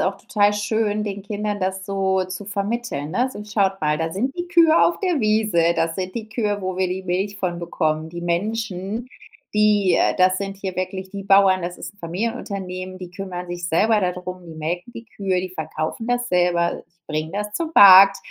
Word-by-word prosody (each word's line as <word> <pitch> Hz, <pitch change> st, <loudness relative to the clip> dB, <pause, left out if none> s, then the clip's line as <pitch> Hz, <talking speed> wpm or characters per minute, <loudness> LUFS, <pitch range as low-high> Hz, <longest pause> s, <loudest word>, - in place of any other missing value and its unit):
auch 190 Hz, +1 st, 0 dB
total 205 Hz, 0 st, +1 dB
schön, 210 Hz, 0 st, 0 dB
den 200 Hz, -1 st, -5 dB
Kindern 205 Hz, 0 st, -3 dB
das 190 Hz, 0 st, -2 dB
so 190 Hz, -1 st, 0 dB
zu 185 Hz, +2 st, -7 dB
vermitteln, 205 Hz, -7 st, -3 dB
ne? 245 Hz, +9 st, +1 dB
So: 210 Hz, -, -8 dB
„Schaut 200 Hz, -2 st, 0 dB
mal, 150 Hz, 0 st, +1 dB
da 165 Hz, 0 st, -1 dB
sind 240 Hz, +10 st, -2 dB
die 350 Hz, 0 st, -3 dB
Kühe 335 Hz, -2 st, +5 dB
auf 340 Hz, -, +2 dB
der 360 Hz, -7 st, 0 dB
Wiese, 215 Hz, -6 st, +2 dB
das 165 Hz, 0 st, 0 dB
sind 185 Hz, 0 st, -4 dB
die 220 Hz, -2 st, -6 dB
Kühe, 205 Hz, -4 st, -1 dB
wo 185 Hz, 0 st, -3 dB
wir 190 Hz, -1 st, +1 dB
die 185 Hz, +1 st, -4 dB
Milch 190 Hz, +3 st, -2 dB
von 180 Hz, -3 st, -2 dB
bekommen. 160 Hz, -2 st, -1 dB
Die 170 Hz, +1 st, -7 dB
Menschen, 205 Hz, +4 st, -2 dB, 0.5 s
die 210 Hz, -3 st, +3 dB
äh, -, -, +2 dB
das 185 Hz, 0 st, +3 dB
sind 195 Hz, 0 st, -5 dB
hier 190 Hz, -2 st, -5 dB
wirklich 190 Hz, +1 st, -4 dB
die 200 Hz, -1 st, -7 dB
Bauern, 195 Hz, -1 st, +5 dB
das 175 Hz, 0 st, -5 dB
ist -, -, -8 dB
'n 205 Hz, -, -32 dB
Familienunternehmen, 185 Hz, -1 st, -4 dB
die 180 Hz, -1 st, -9 dB
kümmern 180 Hz, -1 st, -6 dB
sich 175 Hz, 0 st, -4 dB
selber 215 Hz, +6 st, +3 dB
da 180 Hz, -2 st, 0 dB
drum, 180 Hz, 0 st, -8 dB
die 165 Hz, -, -10 dB
melken 170 Hz, +7 st, -4 dB
die 230 Hz, -, -8 dB
Kühe, 190 Hz, -4 st, -2 dB
die 185 Hz, -, -5 dB
verkaufen 160 Hz, +5 st, -4 dB
das 245 Hz, 0 st, 0 dB
selber, 175 Hz, -1 st, +1 dB
die -, -, -41 dB
bringen 155 Hz, +2 st, -3 dB
das 210 Hz, +1 st, -3 dB
zum 325 Hz, +8 st, -3 dB
Markt.“ 195 Hz, 0 st, +9 dB
190 Hz, 205 wpm, -22 LUFS, 180-210 Hz, 0.5 s, Markt